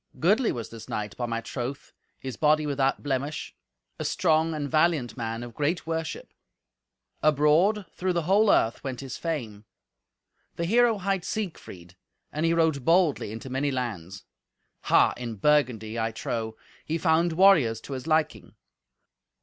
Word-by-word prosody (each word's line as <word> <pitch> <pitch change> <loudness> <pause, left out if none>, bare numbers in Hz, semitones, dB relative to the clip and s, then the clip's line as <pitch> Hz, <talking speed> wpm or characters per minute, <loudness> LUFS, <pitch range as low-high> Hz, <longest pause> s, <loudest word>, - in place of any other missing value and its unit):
Goodly 210 +9 +3
was 115 -3 -5
this 115 -1 -10
knight, 105 -1 -4
by 120 - -3
my 115 0 -2
troth, 130 +3 -6 0.2
his 130 -2 -6
body 155 0 +3
without 135 -2 0
blemish, 140 +1 -3 0.5
a - - -2
strong 160 -2 +1
and 145 -2 -3
valiant 155 -4 +1
man 115 -1 -4
of 120 -1 -9
great 150 +7 -1
worship; 165 0 -4 0.9
abroad, 155 +8 +3
through 185 0 -1
the 170 -1 0
whole 200 +5 +3
earth, 115 -10 +2
went 130 -2 -5
his 135 -2 -6
fame. 120 -11 -4 0.9
The 170 - -2
hero 230 +3 +3
hight 195 -2 -1
Siegfried, 95 - -6 0.4
and 155 +2 0
he 165 - +2
rode 160 -5 +1
boldly 165 - +2
into 115 +4 -8
many 135 +2 0
lands. 100 -8 -5 0.6
Ha! - - +4
in 120 -2 -5
Burgundy, 115 -3 +1
I 115 0 -1
trow, 110 0 -4 0.3
he 160 - -2
found 165 0 +2
warriors 160 - +5
to 140 - -8
his 130 +3 -6
liking. 155 - 0
145 Hz, 150 wpm, -26 LUFS, 115-165 Hz, 0.9 s, warriors